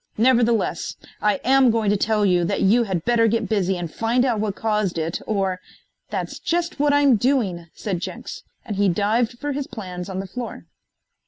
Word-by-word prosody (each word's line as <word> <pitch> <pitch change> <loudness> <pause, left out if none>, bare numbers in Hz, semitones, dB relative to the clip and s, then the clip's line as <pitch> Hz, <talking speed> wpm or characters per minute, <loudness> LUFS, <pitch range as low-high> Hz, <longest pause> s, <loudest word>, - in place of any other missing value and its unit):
Nevertheless, 235 -1 +2 0.3
I 210 -1 +3
am 265 0 +5
going 220 -3 +2
to - - +3
tell 210 +1 +1
you 180 -2 +3
that - - -1
you 230 +5 +4
had 185 -5 -3
better 235 -1 +3
get 225 0 0
busy 190 -4 0
and 170 -2 -5
find 235 +3 +1
out 235 -5 +1
what 205 -2 -1
caused 210 -5 -1
it, 165 +1 -2
or 195 -3 0 0.3
" - - -50
"That's - - -4
just 345 -2 -1
what 290 0 +3
I'm 285 -4 +4
doing," 200 -9 0
said 190 -5 -3
Jenks, - - -6 0.2
and 205 - -4
he 200 -1 +3
dived 220 +6 +1
for 290 +3 -3
his 280 0 -3
plans 185 -6 -7
on 190 0 -4
the 195 - -4
floor. 240 +5 -7
215 Hz, 195 wpm, -22 LUFS, 190-245 Hz, 0.3 s, am